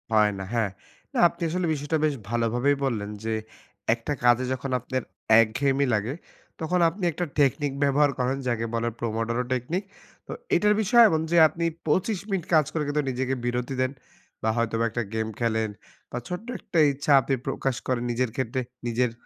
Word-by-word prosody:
হয় 105 -2 +4
না। - - -4
হ্যাঁ। 115 -3 +1 0.4
না - - -3
আপনি 170 - -18
আসলে 180 +2 -1
বিষয়টা 145 +2 -1
বেশ 150 -2 +1
ভালো 120 0 +1
ভাবেই 140 +4 +2
বললেন 110 -6 -2
যে, 110 0 -1 0.6
একটা 120 +5 -3
কাজে 120 +1 +5
যখন 130 +1 -4
আপনার 130 +1 -3 0.4
একঘেয়েমি 135 +5 +1
লাগে, 110 +4 0 0.5
তখন 180 +3 +1
আপনি 185 +4 -9
একটা 175 +3 -2
টেকনিক 145 +1 +2
ব্যবহার 145 +1 +4
করেন। 125 +2 0
যাকে 115 -2 0
বলে 115 0 0
"Pomodoro 115 +1 -1
Technique." 165 - -2 0.4
তো - - -7 0.2
এটার 210 0 +4
বিষয় 235 +3 +6
এমন 160 -4 +1
যে, 170 - +4
আপনি 165 +2 -3 0.2
২৫ 190 +6 +1
মিনিট 190 -4 -1
কাজ 155 -2 +5
করে 155 - 0
কিন্তু 145 +1 +1
নিজেকে 130 +1 -1
বিরতি 120 +2 -1
দেন 130 0 +1 0.5
বা 110 - +2
হয়তোবা 115 0 0
একটা 120 +2 -2
গেম 110 0 -1
খেলেন 110 -2 0 0.4
বা - - -4
ছোট্ট 180 +6 -5
একটা 170 - -1
ইচ্ছা 145 +2 -2
আপনি 135 - -1
প্রকাশ 135 -1 -1
করেন 125 -2 0
নিজের 125 +1 0
ক্ষেত্রে 130 0 -1 0.3
নিজের। 120 +1 +1
130 Hz, 180 wpm, -26 LUFS, 115-150 Hz, 0.6 s, বিষয়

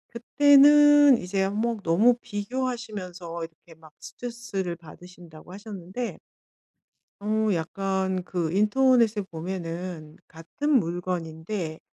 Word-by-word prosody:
그때는 290 +2 +6
이제 190 0 -3
한 195 +1 -2
뭐 230 +2 0
너무 205 +9 +4
비교하시면서 205 -7 -5
이렇게 165 +1 -12
막 155 -1 -17
스트레스를 230 -7 -6
받으신다고 170 0 -15
하셨는데 205 +2 -7 1.0
어 215 +1 0
약간 190 +2 -2
그 170 -4 -3
인터넷에 225 +2 +3
보면은 170 -2 -7
같은 165 - -6
물건인데 170 -1 -4
190 Hz, 250 characters per minute, -25 LUFS, 170-230 Hz, 1.0 s, 그때는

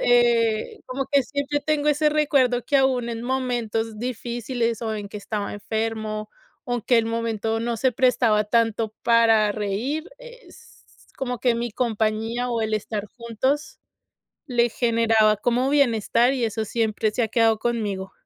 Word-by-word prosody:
eh, 235 -2 +2
como 270 +1 -3
que 280 -1 +4
siempre 285 +2 -2
tengo 300 -1 0
ese 300 +1 +3
recuerdo: 280 -5 +2
que, 285 - +2
aun 260 -3 +2
en 230 -1 -4
momentos 235 -4 -2
difíciles 240 -1 -3
o 220 -1 -2
en 205 -1 -6
que 210 - -8
estaba 205 0 -4
enfermo 215 0 -3 0.3
o 245 -1 -2
que 240 -2 +3
el 225 - +1
momento 225 -1 -2
no 235 0 -2
se 260 +2 +1
prestaba 235 -4 +2
tanto 225 0 +1
para 225 -3 +4
reír, 225 - -3
s - - -15 0.4
como 250 -3 -3
que 245 -2 +2
mi 235 0 -3
compañía 225 +1 -1
o 230 -1 -1
el 220 0 -1
estar 210 0 -3
juntos 250 +6 -3 0.7
le 240 -2 +2
generaba 225 -2 +3
como 245 +5 0
bienestar, 240 -2 +3
y 245 -3 -1
eso 220 0 -2
siempre 220 0 0
se 245 - 0
ha 225 - 0
quedado 225 -1 +3
conmigo. 205 -5 -2
230 Hz, 155 wpm, -23 LUFS, 220-250 Hz, 0.7 s, que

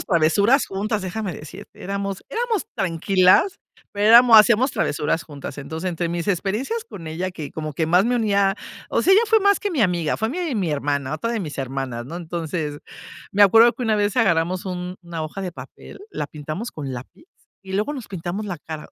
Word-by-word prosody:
Hacíamos - - -6
travesuras 200 - +3
juntas, 205 +2 -2
déjame 190 +1 -4
decirte, 150 -1 -11
éramos 195 0 -4
éramos 460 -3 -1
tranquilas, 185 - +3 0.3
pero 205 +1 0
éramos 235 0 +8
hacíamos 235 +4 +5
travesuras 150 +3 -1
juntas. 145 -2 -9
Entonces, 160 +5 -4
entre 170 0 -2
mis 170 0 -3
experiencias 210 - -1
con 170 - -10
ella, 175 +4 -3
que 155 -5 -8
como 155 -1 -5
que 160 +3 -1
más 180 +4 +4
me 245 +1 +1
unía 200 -3 +2 0.3
o - - +1
sea, 380 - +4
ella 410 +4 +6
fue 445 +1 +5
más 405 -1 +3
que 410 - -2
mi 315 -8 -1
amiga, 175 -6 +1
fue 220 - -1
mi 320 -3 -2
mi 180 -5 0
hermana, 140 -1 -1
otra 230 +10 -3
de 235 - -1
mis 160 -8 -5
hermanas, 130 -3 -4
¿no? 160 +7 -7
Entonces, 165 -3 -4 0.5
me 205 +1 +6
acuerdo 225 +4 +6
que 250 - -4
una 220 -1 +2
vez 205 0 0
agarramos 180 -5 +2
un 180 0 -5
una 170 -2 -5
hoja 155 +5 -6
de 185 -2 -4
papel, 170 - -12
la 150 - -4
pintamos 155 +10 -6
con 140 -4 -6
lápiz 130 - -10 0.4
y 190 -1 -7
luego 210 +9 0
nos 255 -6 -8
pintamos 185 +2 -4
la 185 -5 -5
cara. 155 0 -8
185 Hz, 205 wpm, -22 LUFS, 160-220 Hz, 0.5 s, éramos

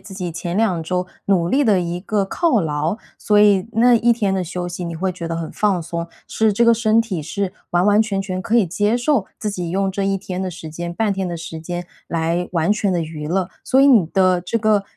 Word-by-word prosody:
自 195 - -12
己 180 -3 -4
前 170 +2 -4
2 190 -7 +1
周 180 +2 -2 0.2
努 175 -4 +2
力 280 +8 +2
的 205 -7 +3
一 175 0 -3
个 205 0 0
犒 270 - +1
劳。 155 +3 -1 0.2
所 210 -1 +2
以 205 -1 +4
那 240 +2 +5
一 235 +1 +4
天 205 -4 0
的 185 - 0
休 180 +1 -4
息， 175 0 -5
你 170 -1 -5
会 185 +2 -1
觉 170 -2 -6
得 165 - -2
很 165 -1 -5
放 200 -4 +1
松， 170 +1 -5 0.2
是 220 -1 +1
这 235 +4 +2
个 235 0 +6
身 225 0 +3
体 195 -9 -3
是 190 +4 -3 0.2
完 175 +3 +2
完 210 +1 +5
全 200 -3 -2
全 185 -1 -4
可 235 - +1
以 210 -6 +4
接 205 +6 +1
受 245 -4 +1
自 215 - -3
己 180 -4 -4
用 195 +2 0
这 195 +1 -3
一 195 0 0
天 185 0 -5
的 185 - -3
时 165 -2 -9
间、 170 +2 -5
半 210 +3 0
天 190 -2 -2
的 170 - -4
时 160 -1 -7
间 175 +1 -5 0.2
来 170 +2 -1
完 170 +3 +1
全 205 -3 0
地 175 - 0
娱 155 -2 -5
乐。 185 +1 0
所 265 - +3
以 275 - +6
你 230 -10 +6
的 185 0 +2
这 180 +6 -2
个， 215 -2 +2
185 Hz, 265 characters per minute, -20 LUFS, 170-210 Hz, 0.2 s, 个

